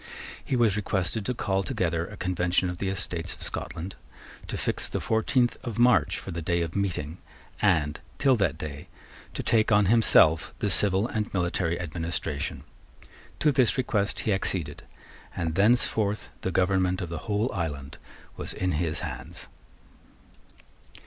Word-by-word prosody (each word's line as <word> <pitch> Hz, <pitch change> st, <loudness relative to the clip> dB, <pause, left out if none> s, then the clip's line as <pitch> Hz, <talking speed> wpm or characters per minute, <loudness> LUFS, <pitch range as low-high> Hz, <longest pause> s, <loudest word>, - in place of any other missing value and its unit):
He -, -, -1 dB
was 115 Hz, -5 st, +3 dB
requested 100 Hz, 0 st, -1 dB
to 125 Hz, -, 0 dB
call 95 Hz, -3 st, 0 dB
together 85 Hz, -3 st, -1 dB
a 105 Hz, -, -10 dB
Convention 90 Hz, 0 st, 0 dB
of 90 Hz, -, -8 dB
the 95 Hz, -, -1 dB
Estates 90 Hz, -3 st, -2 dB
of -, -, -10 dB
Scotland, 90 Hz, +4 st, -4 dB, 0.5 s
to -, -, -4 dB
fix -, -, 0 dB
the -, -, -2 dB
fourteenth 120 Hz, +2 st, +1 dB
of 115 Hz, -3 st, -5 dB
March 125 Hz, +1 st, +4 dB
for 95 Hz, -, -7 dB
the 85 Hz, -1 st, -4 dB
day 85 Hz, +1 st, 0 dB
of 85 Hz, 0 st, -5 dB
meeting, 90 Hz, -5 st, -2 dB, 0.4 s
and, 80 Hz, -7 st, +2 dB, 0.2 s
till 135 Hz, -2 st, +4 dB
that 90 Hz, -7 st, +1 dB
day, 75 Hz, -3 st, -7 dB, 0.5 s
to -, -, -3 dB
take 110 Hz, 0 st, +3 dB
on 105 Hz, 0 st, +5 dB
himself 90 Hz, -7 st, +4 dB
the 105 Hz, -, -1 dB
civil 100 Hz, +1 st, +3 dB
and 110 Hz, -2 st, -3 dB
military 85 Hz, -1 st, 0 dB
administration. 80 Hz, -3 st, -3 dB, 0.8 s
To 150 Hz, -, +5 dB
this 130 Hz, -3 st, +3 dB
request 105 Hz, -6 st, 0 dB
he 105 Hz, -, +1 dB
acceded; 85 Hz, -6 st, -2 dB, 0.5 s
and 80 Hz, -1 st, -2 dB
thenceforth 105 Hz, +1 st, +2 dB
the -, -, -1 dB
government 95 Hz, 0 st, +2 dB
of 90 Hz, -, -4 dB
the 85 Hz, -1 st, -4 dB
whole 105 Hz, +5 st, +1 dB
island 75 Hz, -7 st, -4 dB, 0.4 s
was -, -, -4 dB
in 95 Hz, 0 st, 0 dB
his 80 Hz, 0 st, -1 dB
hands. -, -, -7 dB
95 Hz, 155 wpm, -27 LUFS, 85-105 Hz, 0.8 s, on